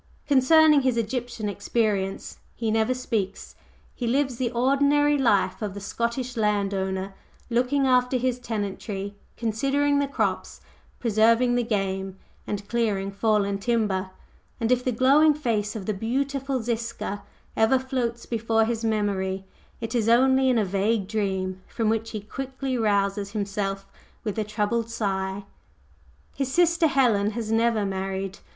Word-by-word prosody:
Concerning 300 +2 +6
his 255 -3 +1
Egyptian 235 -1 -2
experience 205 -1 -1 0.2
he 225 -2 -1
never 220 +2 +2
speaks, 225 -6 -3 0.4
he 240 - -4
lives 260 0 +1
the 245 -1 0
ordinary 280 +4 +3
life 235 -9 +2
of 205 -2 -3
the - - -5
Scottish 235 +5 -3
land 210 -3 +1
owner, 190 0 -2 0.4
looking 255 +4 +2
after 250 0 +3
his 250 0 -1
tenantry, 205 -3 -4 0.2
considering 275 +6 +1
the 285 - +1
crops, 280 - -2 0.4
preserving 230 +2 +3
the 245 - +2
game, 195 -3 -2 0.3
and 200 -1 -4
clearing 210 -5 0
fallen 200 -1 +1
timber; 205 -4 0 0.5
and 230 0 0
if 250 0 +3
the 255 - 0
glowing 280 +6 +5
face 220 -7 -1
of 205 -4 -5
the 215 - -1
beautiful 270 +4 -2
Ziska 230 -3 -3 0.3
ever 220 +4 +4
floats 255 -3 -3
before 225 -1 +1
his 230 0 -2
memory, 195 -3 -1 0.4
it 225 - -4
is 230 -2 +1
only 260 +2 +4
in 250 - +3
a 215 - +2
vague 200 +2 0
dream 190 -3 -2
from 225 -2 -1
which 225 0 -1
he 215 - -5
quickly 265 +4 -4
rouses 200 -2 0
himself 195 -2 -2 0.4
with 215 -1 -3
a - - +1
troubled 215 +2 -1
sigh. 195 -3 -2 0.9
His 270 -2 -2
sister 340 +1 +3
Helen 235 -8 +3
has 225 -2 -3
never 225 -2 +2
married. 195 0 -3
225 Hz, 145 wpm, -25 LUFS, 200-255 Hz, 0.9 s, Concerning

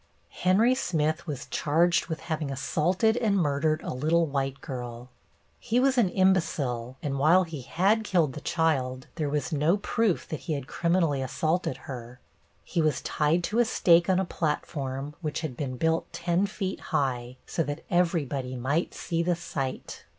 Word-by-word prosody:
Henry 205 +7 +4
Smith 165 - -1
was 145 -4 -4
charged 165 +3 +2
with 160 -2 -4
having 155 -3 -3
assaulted 180 - +1
and 215 -5 +2
murdered 155 -1 +1
a - - -3
little 160 +6 +2
white 135 -2 -2
girl. 125 -3 -7 0.5
He 240 +1 +1
was 265 +1 +3
an 235 -7 +3
imbecile, 140 -10 +1
and 140 -2 -2
while 165 +6 +5
he 160 -5 -6
had 195 - +2
killed 170 -9 +1
the 150 - -7
child, 130 -7 0
there 155 -3 -2
was 150 +2 -1
no 155 +6 +3
proof 210 -1 0
that 155 - -3
he 160 - -3
had 140 -3 -3
criminally 170 -2 +1
assaulted 155 +2 -1
her. 125 -1 -8 0.4
He 170 - -1
was 155 -1 +1
tied 160 +3 +1
to 215 +6 0
a 240 - +5
stake 175 -4 +4
on 185 0 +4
a 190 - +1
platform 145 -4 -3
which 155 -2 -3
had 155 -6 -4
been 130 -2 -4
built 160 +4 0
ten 175 +3 0
feet 195 -2 -4
high, 125 -2 -2
so - - -2
that 145 0 -3
everybody 145 -7 0
might 140 +7 -1
see 170 -2 -2
the 175 +1 +1
sight. 135 -6 -5
155 Hz, 170 wpm, -27 LUFS, 135-175 Hz, 0.5 s, while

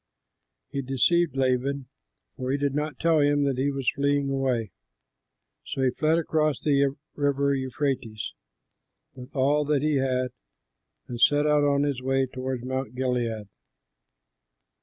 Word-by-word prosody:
He 140 - -2
deceived 135 +4 +2
Laban, 130 +1 0 0.5
for 130 -1 -4
he 140 - +1
did 140 -1 0
not 150 -1 -3
tell 165 -2 +3
him 145 0 +3
that 135 -2 0
he 140 +2 +2
was 135 -3 -4
fleeing 140 0 0
away. 130 -6 0 0.9
So 135 -2 -3
he 130 - +3
fled 155 +5 +2
across 155 -3 +1
the 140 -2 +2 0.2
river 140 -1 +1
Euphrates, 130 -5 -2 0.8
with 125 +2 -12
all 145 +3 +3
that 145 -1 +1
he 150 -2 +2
had, 130 -1 0 0.8
and 120 -1 -6
set 145 0 +5
out 150 -1 +3
on 140 0 +3
his 140 -3 -1
way 135 +1 +1
toward 130 -1 -5
Mount 130 -2 -3
Gilead. 120 -5 -1
135 Hz, 140 wpm, -26 LUFS, 130-145 Hz, 0.9 s, set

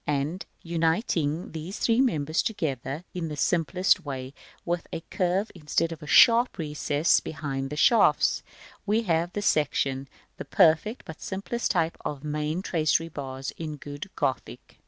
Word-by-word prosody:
and 150 +5 -1 0.2
uniting 165 -1 0
these 165 +5 -6
three 230 +2 +3
members 155 - +1
together 150 - -3
in 175 -2 -3
the 150 -1 -6
simplest 175 +4 +2
way, 135 -2 -6 0.3
with 175 0 -2
a - - -3
curved 185 +3 0
instead 165 0 -1
of 165 - -7
a 150 - -9
sharp 235 - +6
recess 150 0 +1
behind 135 -3 -4
the 150 - -5
shafts, 230 +10 +4 0.4
we 215 +3 +1
have 170 -2 0
the 205 - -3
section 135 -5 +1
b, - - -31 0.3
the - - -6
perfect, 185 +9 +3
but 160 - -10
simplest 205 +5 -3
type 165 -3 0
of 145 -2 -4
the 150 - -7
main 150 +4 -2
tracery 165 -1 +1
bars 135 -3 -6
in 155 -2 -5
good 145 0 -8
Gothic. - - -3
160 Hz, 155 wpm, -27 LUFS, 145-180 Hz, 0.4 s, sharp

